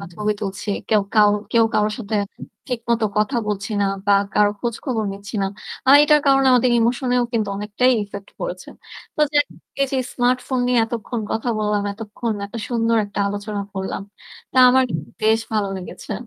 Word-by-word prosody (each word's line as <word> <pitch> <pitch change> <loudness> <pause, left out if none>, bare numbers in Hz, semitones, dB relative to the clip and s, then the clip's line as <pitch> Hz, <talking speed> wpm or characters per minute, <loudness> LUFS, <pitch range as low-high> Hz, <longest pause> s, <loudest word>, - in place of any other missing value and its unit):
বা 200 - -7
ছবি 210 0 0
তুলছি। 205 +1 -5 0.2
কেউ 215 -2 +3
কাউ 210 -1 +6 0.2
কেউ 230 -1 +5
কারো 210 0 +3
সাথে 215 -1 -4 0.5
ঠিকমতো 235 -2 -1
কথা 215 +5 +1
বলছি 200 +1 -3
না 200 - +3 0.2
বা 205 - +5 0.2
কারো 210 0 +4
খোঁজখবর 235 -1 -2
নিচ্ছি 200 +2 -10
না। - - +1 0.4
আ - - +6
এটার 300 0 +5
কারণে 270 -1 +4
আমাদের 250 0 +4
emotion-এও 245 +1 +1
কিন্তু 220 -3 0
অনেকটাই 210 +5 +1
effect 200 -1 -8
পড়েছে। - - -5 0.5
তো - - -2
যে 295 - +4 0.4
এই 275 - +4
যে - - +1 0.2
smartphone 250 +1 +1
নিয়ে 250 -1 +3
এতক্ষণ 230 +1 -4
কথা 225 +2 -2
বললাম, 210 -1 0
এতক্ষণ 220 +2 -4
একটা 215 +3 -7
সুন্দর 230 -1 +1
একটা 205 - -8
আলোচনা 205 0 -4
করলাম, 190 0 -4 0.5
তা - - -9
আমার 260 +1 +4 0.4
বেশ 220 +1 +4
ভালো 210 -2 +1
লেগেছে। 185 +3 -8
225 Hz, 170 wpm, -21 LUFS, 205-245 Hz, 0.5 s, কাউ